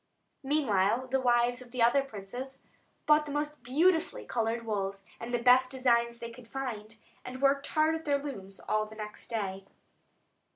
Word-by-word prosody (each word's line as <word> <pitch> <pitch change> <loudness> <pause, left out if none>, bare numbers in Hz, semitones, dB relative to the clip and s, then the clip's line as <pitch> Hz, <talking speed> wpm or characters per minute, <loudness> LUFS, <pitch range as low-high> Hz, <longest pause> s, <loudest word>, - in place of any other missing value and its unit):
Meanwhile 255 -5 +1
the 265 0 +1
wives 245 0 +2
of 250 - -12
the 240 -1 0
other 240 +4 +5
princes 255 +2 -8 0.4
bought 300 0 +4
the - - -5
most 295 0 -3
beautifully 320 +7 +1
coloured 230 0 -1
wools, 195 -2 -3 0.2
and 230 +1 -6
the 240 - +2
best 255 +1 +6
designs 235 -3 +2
they 235 0 -7
could 230 0 -13
find, 225 -5 -5 0.3
and 255 +1 -7
worked 275 +1 +2
hard 310 +1 +2
at 320 0 -4
their 285 -1 +2
looms 200 -10 -8
all 215 0 0
the 220 - -12
next 210 -1 -8
day. 195 -4 -3
245 Hz, 170 wpm, -30 LUFS, 220-275 Hz, 0.4 s, best